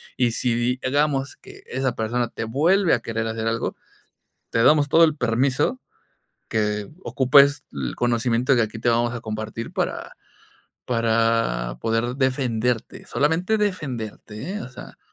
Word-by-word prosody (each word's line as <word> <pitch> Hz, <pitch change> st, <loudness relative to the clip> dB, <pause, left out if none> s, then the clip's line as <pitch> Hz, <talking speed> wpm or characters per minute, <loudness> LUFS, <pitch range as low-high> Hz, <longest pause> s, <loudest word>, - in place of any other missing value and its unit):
y 120 Hz, -2 st, +2 dB
si 120 Hz, +1 st, 0 dB
di 120 Hz, +2 st, 0 dB
hagamos 140 Hz, 0 st, 0 dB
que 395 Hz, 0 st, -15 dB
esa 130 Hz, -2 st, -2 dB
persona 120 Hz, +2 st, -1 dB
te 110 Hz, -, -5 dB
vuelve 165 Hz, -, +2 dB
a 120 Hz, -, +3 dB
querer 115 Hz, -1 st, -3 dB
hacer 110 Hz, 0 st, -3 dB
algo, 115 Hz, 0 st, -1 dB, 0.8 s
te 115 Hz, -, +2 dB
damos 150 Hz, +1 st, +5 dB
todo 160 Hz, +3 st, +5 dB
el 155 Hz, -2 st, +1 dB
permiso 130 Hz, -, +1 dB, 0.7 s
que 105 Hz, -2 st, -1 dB
ocupes 140 Hz, +2 st, +4 dB
el 65 Hz, -3 st, -4 dB
conocimiento 120 Hz, +2 st, +1 dB
que 120 Hz, -, +3 dB
aquí 110 Hz, +1 st, -4 dB
te 120 Hz, +2 st, +1 dB
vamos 120 Hz, +1 st, +1 dB
a 120 Hz, -, -5 dB
compartir, 110 Hz, +1 st, -5 dB
para -, -, -3 dB, 0.7 s
para 115 Hz, -, +1 dB
poder 115 Hz, +2 st, -1 dB
defenderte. 125 Hz, -3 st, -1 dB
Solamente 165 Hz, +9 st, +1 dB
defenderte, 130 Hz, -, -4 dB
¿eh?, -, -, -4 dB
o -, -, -7 dB
sea. 130 Hz, -, -12 dB
120 Hz, 145 wpm, -23 LUFS, 115-140 Hz, 0.8 s, damos